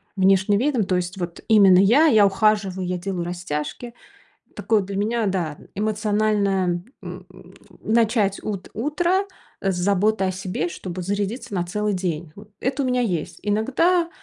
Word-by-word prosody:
внешним 195 Hz, +1 st, +3 dB
видом. 260 Hz, -3 st, +1 dB
То 185 Hz, -, 0 dB
есть 180 Hz, +1 st, -4 dB
вот 175 Hz, -1 st, -5 dB
именно 200 Hz, -5 st, +6 dB
я. 235 Hz, +11 st, +5 dB
Я 220 Hz, -8 st, +6 dB
ухаживаю, 195 Hz, -2 st, +1 dB
я 180 Hz, 0 st, -2 dB
делаю 180 Hz, -1 st, -3 dB
растяжки. 175 Hz, +6 st, -5 dB, 0.6 s
Такое 220 Hz, -2 st, +1 dB
для 195 Hz, +1 st, -6 dB
меня, 220 Hz, +3 st, 0 dB
да, 175 Hz, -6 st, -2 dB
н -, -, -16 dB
эмоциональное, 205 Hz, -4 st, 0 dB, 0.2 s
м, -, -, -9 dB, 0.6 s
начать 220 Hz, -3 st, +1 dB
ут 200 Hz, -3 st, -5 dB
утро, 340 Hz, -, 0 dB, 0.4 s
э, 195 Hz, -, +1 dB
с -, -, -3 dB
заботы 200 Hz, +2 st, +1 dB
о 185 Hz, -, 0 dB
себе, 185 Hz, -3 st, -3 dB
чтобы 180 Hz, +1 st, -6 dB
зарядиться 200 Hz, +4 st, -3 dB
на 180 Hz, -3 st, 0 dB
целый 210 Hz, +3 st, -1 dB
день, 175 Hz, -4 st, -3 dB
вот. 205 Hz, +1 st, -13 dB
Это 275 Hz, +2 st, -1 dB
у -, -, -1 dB
меня 250 Hz, 0 st, +1 dB
есть. 175 Hz, -6 st, -3 dB
Иногда 275 Hz, -, +1 dB
200 Hz, 160 wpm, -22 LUFS, 185-220 Hz, 0.6 s, именно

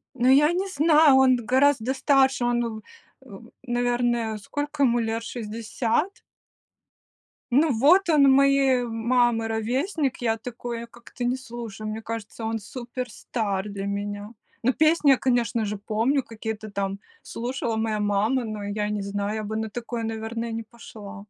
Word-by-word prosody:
Ну, 250 Hz, 0 st, +1 dB
я 295 Hz, +4 st, +5 dB
не 380 Hz, +2 st, -1 dB
знаю, 305 Hz, -3 st, +5 dB
он 260 Hz, -1 st, +5 dB
гораздо 265 Hz, -1 st, +3 dB
старше, 270 Hz, -2 st, +3 dB
он, 240 Hz, 0 st, +1 dB
у 220 Hz, -2 st, -5 dB, 0.5 s
м, 225 Hz, +2 st, -13 dB
наверное, 240 Hz, -2 st, 0 dB
сколько 290 Hz, +6 st, -3 dB
ему 240 Hz, -2 st, +3 dB
лет, 225 Hz, 0 st, -2 dB
60? 230 Hz, -, -2 dB, 1.3 s
Ну, 295 Hz, +4 st, +4 dB
вот 335 Hz, -, +4 dB
он 280 Hz, -3 st, +6 dB
моей 275 Hz, -2 st, +4 dB
мамы 235 Hz, 0 st, +1 dB
ровесник. 260 Hz, -, -1 dB
Я 225 Hz, -1 st, +1 dB
такое 235 Hz, 0 st, -6 dB
как-то 240 Hz, +1 st, -10 dB
не 245 Hz, +1 st, +1 dB
слушаю, 230 Hz, -4 st, -7 dB
мне 220 Hz, +1 st, -5 dB
кажется, 225 Hz, 0 st, -6 dB
он 225 Hz, 0 st, -2 dB
супер-стар 225 Hz, -4 st, -4 dB
для 200 Hz, -1 st, -5 dB
меня. 205 Hz, +1 st, -4 dB, 0.3 s
Ну, 250 Hz, +3 st, +3 dB
песни 310 Hz, -2 st, +4 dB
я, 265 Hz, -, +5 dB
конечно 235 Hz, -3 st, 0 dB
же, 210 Hz, 0 st, -3 dB
помню, 225 Hz, +7 st, 0 dB
какие-то 220 Hz, -1 st, -6 dB
там 195 Hz, -1 st, -3 dB, 0.2 s
слушала 240 Hz, -1 st, -3 dB
моя 220 Hz, -1 st, -1 dB
мама. 210 Hz, +5 st, +1 dB
Но 215 Hz, -2 st, -5 dB
я 210 Hz, +1 st, -2 dB
не 210 Hz, -1 st, -2 dB
знаю, 200 Hz, +1 st, -3 dB
я 215 Hz, -, -3 dB
бы 220 Hz, +1 st, -4 dB
на 220 Hz, 0 st, -3 dB
такое, 235 Hz, 0 st, -5 dB
наверное, 225 Hz, +1 st, -4 dB
не 225 Hz, 0 st, -4 dB
пошла. 215 Hz, -2 st, -11 dB
235 Hz, 150 wpm, -25 LUFS, 220-260 Hz, 1.3 s, он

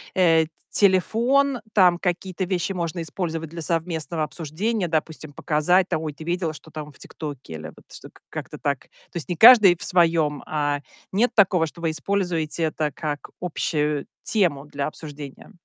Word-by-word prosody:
э, 165 Hz, -3 st, +4 dB
т 155 Hz, -, -17 dB, 0.2 s
телефон, 240 Hz, +8 st, +3 dB
там 180 Hz, -4 st, +5 dB
какие-то 185 Hz, +1 st, -2 dB
вещи 180 Hz, +1 st, -1 dB
можно 170 Hz, -1 st, -3 dB
использовать 165 Hz, -1 st, -3 dB
для 170 Hz, +1 st, -7 dB
совместного 165 Hz, 0 st, -1 dB
обсуждения, 175 Hz, +7 st, -2 dB
допустим, 155 Hz, -1 st, -3 dB
показать 165 Hz, +5 st, +2 dB
там: 155 Hz, -, -1 dB
"Ой, 155 Hz, -2 st, -4 dB
ты 150 Hz, -, -11 dB
видела, 170 Hz, -1 st, -1 dB
что 160 Hz, -, -13 dB
там 150 Hz, -1 st, -7 dB
в -, -, -20 dB
"Тиктоке"?" 145 Hz, -, -8 dB
Или 80 Hz, 0 st, -7 dB
вот -, -, -18 dB
что -, -, -10 dB, 0.2 s
как-то -, -, -7 dB
так. 140 Hz, -2 st, -1 dB
То -, -, -28 dB, 0.3 s
есть 170 Hz, -, -4 dB
не 175 Hz, -, -2 dB
каждый 215 Hz, -3 st, +9 dB
в -, -, -8 dB
своём, 165 Hz, -5 st, +2 dB
а, 145 Hz, -2 st, -1 dB, 0.3 s
нет 225 Hz, +6 st, +2 dB
такого, 185 Hz, -5 st, +4 dB
что 165 Hz, +2 st, -10 dB
вы 165 Hz, -, +1 dB
используете 165 Hz, -1 st, -1 dB
это 155 Hz, -1 st, -1 dB
как 145 Hz, 0 st, -5 dB
общую 150 Hz, -4 st, -1 dB, 0.2 s
тему 170 Hz, -10 st, +1 dB
для 145 Hz, -1 st, -4 dB
обсуждения? 145 Hz, -1 st, -9 dB
165 Hz, 170 wpm, -24 LUFS, 150-180 Hz, 0.3 s, каждый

